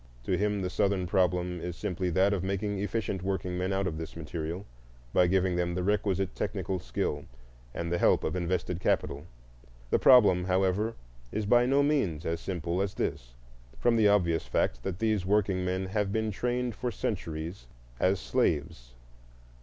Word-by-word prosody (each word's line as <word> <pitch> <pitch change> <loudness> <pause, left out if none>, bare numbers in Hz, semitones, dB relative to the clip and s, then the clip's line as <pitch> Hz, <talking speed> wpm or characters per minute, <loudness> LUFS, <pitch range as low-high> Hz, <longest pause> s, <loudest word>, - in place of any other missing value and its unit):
To 90 - 0
him 105 +1 0
the 90 - -1
Southern 100 -3 +1
problem 90 -2 +1
is 90 -1 -4
simply 95 -2 -2
that 95 +4 +3
of 95 -3 -1
making 100 +1 -2
efficient 100 -1 -2
workingmen 90 -1 -2
out 95 0 0
of 80 -3 -3
this 80 - -7
material, 85 +3 -5 0.5
by 90 - +5
giving 95 0 +2
them 85 0 0
the 90 - -1
requisite 95 -1 0
technical 95 -2 -2
skill 75 -3 -3 0.5
and 85 +4 -4
the 85 - +1
help - - +4
of 80 - -1
invested 90 0 -1
capital. 75 -4 -1 0.6
The - - +4
problem, 100 -9 +6
however, 95 +4 +1 0.4
is 110 - -2
by 120 +3 +4
no 140 +2 +4
means 100 - 0
as 85 0 -1
simple 85 0 -2
as 100 -1 -2
this, - - -3 0.4
from 120 -1 +2
the 110 -2 +5
obvious 90 -5 +2
fact - - 0
that 90 +6 -4
these 110 -2 +1
workingmen 95 -2 +1
have 100 +1 -1
been 110 0 0
trained 125 +3 -1
for 125 +3 -3
centuries 80 - -4 0.3
as 95 +1 +2
slaves. 70 - -1
95 Hz, 165 wpm, -29 LUFS, 85-105 Hz, 0.6 s, problem